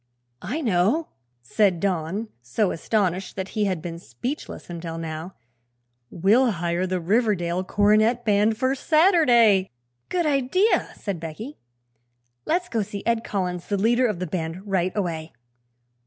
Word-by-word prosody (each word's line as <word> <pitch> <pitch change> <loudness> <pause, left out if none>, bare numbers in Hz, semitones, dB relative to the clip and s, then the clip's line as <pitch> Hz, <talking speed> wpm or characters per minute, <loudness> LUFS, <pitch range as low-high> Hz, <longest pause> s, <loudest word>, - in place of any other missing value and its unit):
"I 250 - -3
know," 225 - +1 0.3
said 185 - +2
Don, 190 +3 -2
so 150 - 0
astonished 190 0 -1
that 190 0 -4
he 210 -1 0
had 185 -5 -2
been 170 -1 -6
speechless 210 - -6
until 165 -1 -6
now; 165 +2 -6 0.7
"we'll 215 +7 +3
hire 175 +1 -1
the 185 0 -1
Riverdale 185 -2 +1
Cornet 215 +5 +2
Band 210 +1 +3
for 260 +3 +1
Saturday." 265 - +4 0.4
"Good 350 -2 0
idea," 300 - +2
said 195 -5 -4
Becky. 165 - -7 0.9
"Let's 355 +3 +1
go 230 -8 -1
see 200 0 -6
Ed 230 0 +1
Collins, 180 -3 -3
the 200 - 0
leader 240 +5 +3
of 210 -5 -2
the 180 - -3
band, 170 +2 -4
right 185 -2 0
away." 165 -5 -3
200 Hz, 140 wpm, -24 LUFS, 175-235 Hz, 0.9 s, Saturday